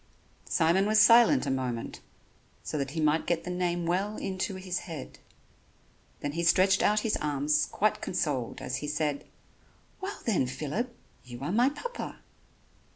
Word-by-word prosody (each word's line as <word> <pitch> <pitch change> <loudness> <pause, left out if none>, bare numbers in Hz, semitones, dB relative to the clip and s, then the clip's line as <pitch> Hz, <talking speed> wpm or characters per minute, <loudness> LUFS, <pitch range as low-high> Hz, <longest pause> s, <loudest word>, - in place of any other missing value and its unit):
Simon 175 +4 +3
was 215 0 +4
silent 240 +5 +6
a - - -1
moment 125 -3 -3 0.6
so - - -5
that 135 -1 -2
he 160 - -5
might 155 +1 +2
get 170 -1 0
the 180 - -5
name 175 -1 -1
well 195 +5 -1
into 190 +1 -3
his 185 -1 -3
head; 160 -6 -8 1.0
then 145 - -2
he 165 +3 -3
stretched 185 +3 +4
out 210 +1 +3
his 220 - 0
arms 150 0 +1
quite 215 0 0
consoled 140 -9 -2
as 130 0 -3
he 150 - -5
said: 150 -1 -1 0.8
"Well, 390 +2 -5
then, 190 - +2
Phillip, 155 - -3 0.3
you 120 0 -10
are 150 - -2
my 240 +6 +4
Papa." 480 +13 -6
175 Hz, 155 wpm, -29 LUFS, 145-205 Hz, 1.0 s, silent